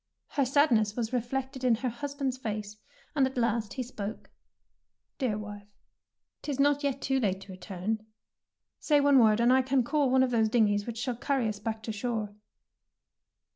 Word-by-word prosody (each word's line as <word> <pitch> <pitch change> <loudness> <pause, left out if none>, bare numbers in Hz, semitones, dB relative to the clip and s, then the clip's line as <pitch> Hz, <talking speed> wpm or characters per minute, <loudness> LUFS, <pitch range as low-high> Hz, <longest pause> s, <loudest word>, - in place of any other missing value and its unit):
Her 280 - +1
sadness 245 -6 +3
was 235 0 -3
reflected 260 +2 -2
in 245 -2 +4
her 250 +3 -2
husband's 275 +2 -3
face, 210 -3 -4 0.4
and 270 -3 +4
at 265 - -8
last 230 -3 0
he 255 - -3
spoke. 220 -3 -7 0.9
"Dear 240 -7 0
wife, 205 -1 -8 0.7
^tis 280 -3 -4
not 285 0 +3
yet 275 -1 -1
too 270 0 +1
late 195 -5 0
to 195 - -11
return. 190 +3 -4 0.8
Say 295 -2 +3
one 280 -1 +5
word, 220 -2 +5
and 240 +2 +5
I 265 - +5
can 260 0 +1
call 285 +2 +1
one 260 0 +4
of 255 - 0
those 225 -2 +2
dingeys 210 -2 +2
which 235 -1 -5
shall 245 +1 -2
carry 260 0 0
us 210 -2 -3
back 220 +1 -4
to 220 - -3
shore." 215 -1 -3
240 Hz, 175 wpm, -29 LUFS, 215-265 Hz, 0.9 s, one